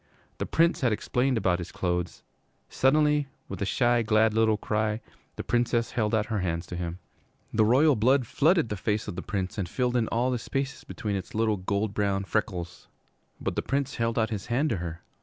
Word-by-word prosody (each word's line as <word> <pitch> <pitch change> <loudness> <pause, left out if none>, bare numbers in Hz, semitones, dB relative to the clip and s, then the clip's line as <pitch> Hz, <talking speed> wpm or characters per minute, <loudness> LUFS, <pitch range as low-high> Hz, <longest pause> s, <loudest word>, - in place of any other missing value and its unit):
The - - -2
Prince 170 +1 +2
had 125 -3 +3
explained 125 +4 0
about 90 -4 +1
his 85 -1 -6
clothes. 90 0 -2 0.5
Suddenly, 150 +1 +3 0.2
with 95 -1 -7
a 100 - 0
shy, 120 +2 +3
glad 110 -1 +3
little 110 -1 +3
cry, 110 0 -1 0.4
the - - -5
Princess 120 -1 +1
held 110 -1 0
out 105 -1 +1
her 110 -2 -2
hands 85 -2 -2
to 90 - -7
him. 85 0 -4 0.6
The 110 - +4
royal 135 +6 +5
blood 125 +4 +3
flooded 155 - +2
the 105 - -3
face 105 +3 -1
of - - -5
the 95 - -4
Prince 95 -1 -3
and 90 -3 -2
filled 125 +2 0
in 115 -2 +2
all 120 +3 +1
the 125 - -1
spaces 135 +3 -3
between 105 -2 -4
its 95 +1 -6
little 110 -1 +2
gold 100 +3 -1
brown 100 -1 0
freckles. 95 -5 -3 0.5
But - - -3
the - - 0
Prince 140 -1 -2
held 115 0 0
out 110 0 +1
his 100 -4 -4
hand 135 +6 +1
to 110 - 0
her. 85 -1 -5
110 Hz, 205 wpm, -27 LUFS, 95-125 Hz, 0.6 s, royal